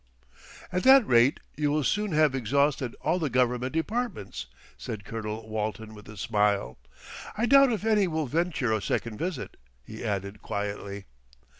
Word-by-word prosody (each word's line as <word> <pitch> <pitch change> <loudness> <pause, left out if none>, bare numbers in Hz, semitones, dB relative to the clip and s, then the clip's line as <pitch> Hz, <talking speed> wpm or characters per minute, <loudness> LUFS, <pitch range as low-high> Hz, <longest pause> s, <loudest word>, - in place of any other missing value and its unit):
"At 180 - 0
that 265 0 +7
rate 120 +4 +4 0.2
you 150 -1 0
will 150 +1 +1
soon 210 +6 0
have 155 -2 +4
exhausted 135 0 +1
all 170 +4 +1
the 155 -4 -1
Government 125 0 +1
Departments," 160 - -3 0.3
said 105 -3 -7
Colonel 110 0 -5
Walton 110 0 -4
with 105 0 -13
a 110 - -10
smile. 100 - 0 0.6
"I 230 - +2
doubt 275 +1 +6
if 220 -2 -2
any 210 -3 +3
will 160 -2 -1
venture 150 -4 0
a 110 - 0
second 110 +1 -2
visit," 175 -5 -4 0.3
he - - -9
added 100 0 -3
quietly. 100 -1 -4
125 Hz, 155 wpm, -27 LUFS, 105-165 Hz, 0.6 s, that